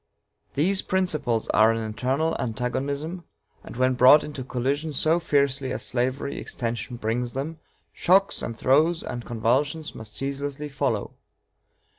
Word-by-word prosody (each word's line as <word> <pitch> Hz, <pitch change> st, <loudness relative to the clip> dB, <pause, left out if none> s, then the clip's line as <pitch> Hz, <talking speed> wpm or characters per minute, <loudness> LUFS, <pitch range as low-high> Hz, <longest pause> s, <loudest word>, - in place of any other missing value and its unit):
These 190 Hz, +7 st, +2 dB
principles 155 Hz, -12 st, 0 dB
are 110 Hz, +1 st, +5 dB
an 115 Hz, -1 st, -2 dB
eternal 135 Hz, +9 st, -1 dB
antagonism, 140 Hz, +8 st, -3 dB, 0.4 s
and -, -, -10 dB
when 130 Hz, 0 st, +3 dB
brought 130 Hz, +4 st, +7 dB
into 145 Hz, -3 st, -6 dB
collision 140 Hz, +5 st, -2 dB
so 160 Hz, +5 st, +3 dB
fiercely 140 Hz, -4 st, +1 dB
as -, -, -2 dB
slavery 130 Hz, +3 st, -1 dB
extension 120 Hz, +1 st, -4 dB
brings 120 Hz, +2 st, -2 dB
them, 150 Hz, +4 st, -4 dB, 0.3 s
shocks 195 Hz, +3 st, +3 dB
and 115 Hz, -, -5 dB
throes 155 Hz, +8 st, +3 dB
and 120 Hz, -1 st, -5 dB
convulsions 135 Hz, +8 st, 0 dB
must 110 Hz, -1 st, -8 dB
ceaselessly 140 Hz, +2 st, -3 dB
follow. 135 Hz, -, -2 dB
135 Hz, 130 wpm, -25 LUFS, 125-155 Hz, 0.4 s, brought